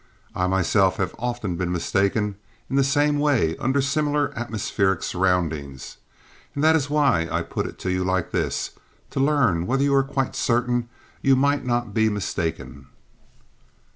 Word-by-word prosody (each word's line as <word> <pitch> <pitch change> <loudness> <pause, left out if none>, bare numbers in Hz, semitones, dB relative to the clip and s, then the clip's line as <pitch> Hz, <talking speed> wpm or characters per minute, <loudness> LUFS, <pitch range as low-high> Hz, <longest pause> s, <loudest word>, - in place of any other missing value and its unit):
I - - -4
have 90 - +2
myself 95 +1 +2
been 95 -2 -1
often 100 -8 -2
mistaken 100 +4 0 0.4
in - - 0
the 135 - +4
same 145 +1 +2
way 130 - +2
under 130 +2 +1
similar 145 0 0
atmospheric 105 -5 -1
surroundings 80 -7 -1 0.6
and 140 - -1
that 160 +1 +5
is 145 -3 0
why 140 - +2
I - - 0
put - - -3
it - - -10
to 95 - -1
you 90 0 0
like 95 -1 -1
this, - - -1 0.4
to - - -3
learn 135 - +2
whether 135 +2 +1
you 140 0 +2
are 135 - +5
quite 135 -1 -2
certain 120 0 0 0.3
you 135 -1 +4
might 140 +1 +1
not 120 -3 -1
be 110 0 +3
mistaken?" 80 -9 -4
115 Hz, 160 wpm, -23 LUFS, 90-140 Hz, 0.6 s, that